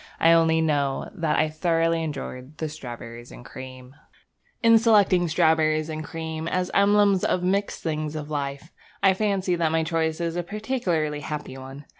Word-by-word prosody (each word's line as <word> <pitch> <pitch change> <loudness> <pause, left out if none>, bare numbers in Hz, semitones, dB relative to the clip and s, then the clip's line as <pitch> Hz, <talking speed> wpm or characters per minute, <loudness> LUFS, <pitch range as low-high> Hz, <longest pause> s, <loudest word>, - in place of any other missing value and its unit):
I 165 - +5
only 165 -1 +4
know 145 -4 0
that 165 -6 0
I 155 - +3
thoroughly 165 +1 +1
enjoyed 140 -2 -6
the 160 - -3
strawberriesandcream. 125 -1 -9 0.7
In 230 0 +7
selecting 200 -6 +4
strawberries 160 -1 +2
and 155 0 -4
cream 160 0 -5
as 180 +1 -1
emblems 200 -1 +4
of 180 - +1
the - - -2
mixed 200 +2 -1
things 155 -1 -2
of 155 0 -6
life, 140 +2 -4 0.3
I 195 -1 +6
fancy 195 -2 0
that 165 -2 0
my 160 0 +1
choice 160 0 -1
is 170 -1 -2
a 175 - 0
particularly 175 - -2
happy 150 -2 -6
one. 135 +2 -10
160 Hz, 160 wpm, -25 LUFS, 150-180 Hz, 0.7 s, In